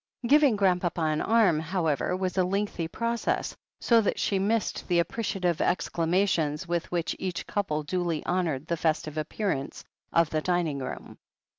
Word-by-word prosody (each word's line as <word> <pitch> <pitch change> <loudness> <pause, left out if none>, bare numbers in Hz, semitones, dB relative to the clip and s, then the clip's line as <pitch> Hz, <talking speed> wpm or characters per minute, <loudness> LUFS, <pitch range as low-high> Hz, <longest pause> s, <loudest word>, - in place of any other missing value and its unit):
Giving 285 -2 +5
Grandpapa 180 -4 +1
an 155 -1 +1
arm, 220 -8 +3
however, 165 0 -1
was 185 -1 -2
a 185 - +3
lengthy 190 -2 -1
process, 230 +6 -2 0.2
so 230 -2 +4
that 205 - 0
she 195 - +1
missed 215 +3 -1
the 175 - +2
appreciative 180 -1 0
exclama 175 +2 +1
tions 155 -1 -1
with 170 -1 -2
which 175 -1 -1
each 185 -2 -3
couple 155 -7 -2
duly 170 0 -2
honoured 165 -6 -1
the 170 +1 -2
festive 155 -1 -1
appearance 155 -2 -3 0.3
of 165 -2 +3
the 155 - 0
dining 170 -5 0
room. 130 - -7
175 Hz, 155 wpm, -27 LUFS, 160-195 Hz, 0.3 s, Giving